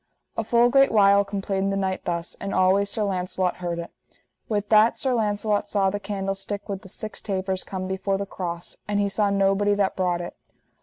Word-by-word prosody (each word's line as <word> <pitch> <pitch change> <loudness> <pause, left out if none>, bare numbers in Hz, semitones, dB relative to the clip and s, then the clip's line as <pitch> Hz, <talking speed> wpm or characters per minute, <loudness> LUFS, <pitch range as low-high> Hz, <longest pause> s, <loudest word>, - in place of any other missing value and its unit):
A 225 - -1
full 235 +2 +3
great 275 +1 +5
while 200 -1 +5
complained 195 -1 -2
the 195 - -1
knight 190 -1 -2
thus, 170 0 -1
and 200 - -3
always 190 +2 +3
Sir 215 +1 -1
Launcelot 185 -2 -1
heard 175 -1 -3
it. 170 0 -6 0.6
With 205 -1 -1
that 220 +1 +5
Sir 260 -2 +1
Launcelot 210 -2 0
saw 195 -2 +2
the 205 - -3
candlestick 195 0 -4
with 195 -2 -4
the 190 - -11
six 215 +2 -4
tapers 190 -1 -2
come 185 -1 -5
before 190 +1 -1
the 200 - -3
cross, 175 -3 -5
and 205 0 0
he 200 0 +1
saw 205 +1 +1
nobody 200 +1 +2
that 200 -1 0
brought 180 -2 0
it. 175 - -7
195 Hz, 200 wpm, -24 LUFS, 190-205 Hz, 0.6 s, great